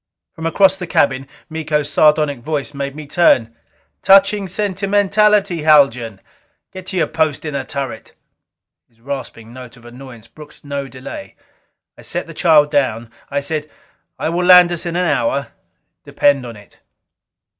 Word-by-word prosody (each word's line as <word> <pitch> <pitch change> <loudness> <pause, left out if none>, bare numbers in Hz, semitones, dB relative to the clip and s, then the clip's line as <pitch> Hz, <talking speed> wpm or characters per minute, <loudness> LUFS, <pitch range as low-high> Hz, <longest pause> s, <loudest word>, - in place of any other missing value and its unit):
From 160 0 -5
across 190 +3 +3
the 180 -2 -6
cabin, 135 -4 0 0.2
Miko's 155 -2 -2
sardonic 150 -1 +2
voice 145 +2 -4
made 140 0 -5
me 155 0 -8
turn. 130 -8 +2 0.5
"Touching 195 +1 +4
sentimentality, 200 -1 +1
Haljan! 125 -9 +3 0.5
Get 185 -1 -10
to 190 - -4
your 170 - +2
post 160 -2 -2
in 150 - -4
the 140 -1 -3
turret!" 140 -2 -6 0.8
His 115 -1 -35
rasping 120 -3 -8
note 125 -1 -12
of 120 - -19
annoyance 120 -2 -12
brooked 150 +3 -16
no 140 -1 -4
delay. 135 - -10 0.6
I - - -11
set - - -5
the - - -11
child 150 -4 +3
down. 120 -6 -1 0.2
I 140 0 -2
said, 150 +1 -4 0.5
"I - - -2
will 175 +2 -1
land 180 -1 +7
us 175 0 -3
in 170 - -4
an 180 +1 0
hour. 140 -3 -1 0.5
Depend 140 -3 +1
on 115 - -9
it." 105 -1 -18
150 Hz, 155 wpm, -17 LUFS, 130-175 Hz, 0.8 s, land